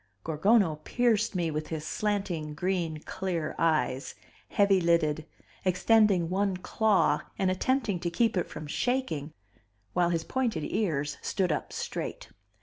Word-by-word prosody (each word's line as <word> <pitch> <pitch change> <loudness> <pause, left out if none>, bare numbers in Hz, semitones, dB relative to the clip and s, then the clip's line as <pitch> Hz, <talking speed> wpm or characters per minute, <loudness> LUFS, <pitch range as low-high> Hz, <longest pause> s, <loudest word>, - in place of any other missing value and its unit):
Gorgono 165 +1 +3
pierced 225 -4 +1
me 170 -3 0
with 155 0 -3
his 160 -1 -4
slanting 180 -7 -2
green, 170 -2 -1
clear 175 -5 -3
eyes, 155 -4 +1 0.3
heavy 200 -2 +3
lidded, 160 -2 +2 0.4
extending 190 -1 +4
one 190 +1 0
claw 210 +2 +2 0.2
and 190 -1 +2
attempting 215 0 0
to 170 - -2
keep 225 +6 +1
it 180 - 0
from 155 - -7
shaking 160 - -1 0.6
while 175 -1 +2
his 165 -2 0
pointed 235 -12 -1
ears 150 -9 -1
stood 185 -4 0
up 150 - -2
straight. - - -5
180 Hz, 135 wpm, -29 LUFS, 160-205 Hz, 0.6 s, extending